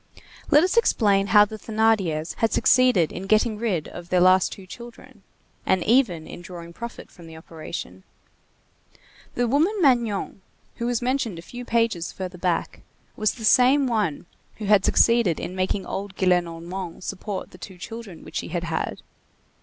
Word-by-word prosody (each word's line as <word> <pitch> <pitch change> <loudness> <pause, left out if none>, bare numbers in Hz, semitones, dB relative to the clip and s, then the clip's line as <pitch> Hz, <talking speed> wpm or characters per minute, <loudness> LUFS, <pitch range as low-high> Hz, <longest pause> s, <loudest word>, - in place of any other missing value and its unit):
Let 295 +2 +6
us 370 +5 0
explain 200 - +3
how 210 -1 +6
the 215 +1 -9
Thénardiers 205 -8 0
had 225 -2 +1
succeeded 250 -11 +4
in 190 +2 -7
getting 215 +1 +2
rid 195 -9 -1
of 175 0 -10
their 180 - +3
last 185 +1 +4
two 195 - -10
children; 235 +5 -12 0.4
and 185 -2 +1
even 215 -10 +2
in - - -10
drawing 170 -2 -10
profit 235 +5 -9
from 170 -3 -14
the 160 0 -11
operation. 160 - -8 1.3
The 245 0 +1
woman 305 - +2
Magnon, 235 - +1 0.4
who 235 - -2
was 245 -1 -1
mentioned 250 -7 -1
a 165 - -9
few 245 +6 -9
pages 230 -8 0
further 185 -1 -7
back, 175 -2 -2 0.3
was 215 0 0
the 225 -3 -6
same 265 +4 +5
one 210 - -1 0.3
who 215 - -7
had 205 -1 +4
succeeded 230 -8 +3
in 180 - -5
making 190 +1 -1
old 195 0 -5
Gillenormand 175 0 -1
support 195 0 -5
the 180 - -15
two 190 +1 -10
children 210 -2 -9
which - - -7
she - - -3
had 175 0 -3
had. 165 -1 -3
200 Hz, 165 wpm, -24 LUFS, 175-235 Hz, 1.3 s, Let